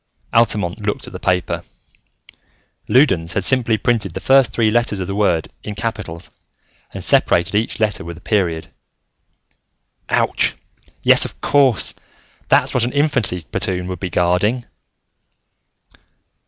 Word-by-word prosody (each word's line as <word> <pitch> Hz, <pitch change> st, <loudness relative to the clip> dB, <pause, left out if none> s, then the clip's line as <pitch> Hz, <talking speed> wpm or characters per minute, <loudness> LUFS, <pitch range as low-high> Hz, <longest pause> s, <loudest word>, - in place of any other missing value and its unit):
Altamont 105 Hz, -3 st, +1 dB
looked 105 Hz, 0 st, -2 dB
at -, -, -11 dB
the -, -, -7 dB
paper. 90 Hz, -1 st, -1 dB, 1.3 s
Loudons 95 Hz, -, +3 dB
had 100 Hz, -, -1 dB
simply 120 Hz, -1 st, +2 dB
printed 105 Hz, -5 st, -1 dB
the -, -, -3 dB
first 135 Hz, +3 st, +4 dB
three 110 Hz, -2 st, +1 dB
letters 115 Hz, -2 st, +1 dB
of 95 Hz, -, -3 dB
the 95 Hz, -, -4 dB
word 95 Hz, -6 st, 0 dB
in 105 Hz, -, -7 dB
capitals 90 Hz, -6 st, -5 dB, 0.6 s
and -, -, -3 dB
separated 85 Hz, +3 st, +3 dB
each 110 Hz, +2 st, -1 dB
letter 110 Hz, -2 st, 0 dB
with 85 Hz, 0 st, -8 dB
a -, -, -14 dB
period. 90 Hz, -7 st, -1 dB, 1.4 s
"Ouch! -, -, +1 dB, 0.5 s
Yes, -, -, +6 dB
of -, -, -6 dB
course, 135 Hz, -6 st, +2 dB, 0.5 s
that's -, -, +3 dB
what 125 Hz, -, +2 dB
an 120 Hz, -, -2 dB
infantry 130 Hz, -, +1 dB
platoon 90 Hz, -1 st, -2 dB
would 90 Hz, -2 st, -5 dB
be 95 Hz, -, -4 dB
guarding. 90 Hz, +8 st, +1 dB
105 Hz, 135 wpm, -19 LUFS, 90-120 Hz, 1.4 s, Yes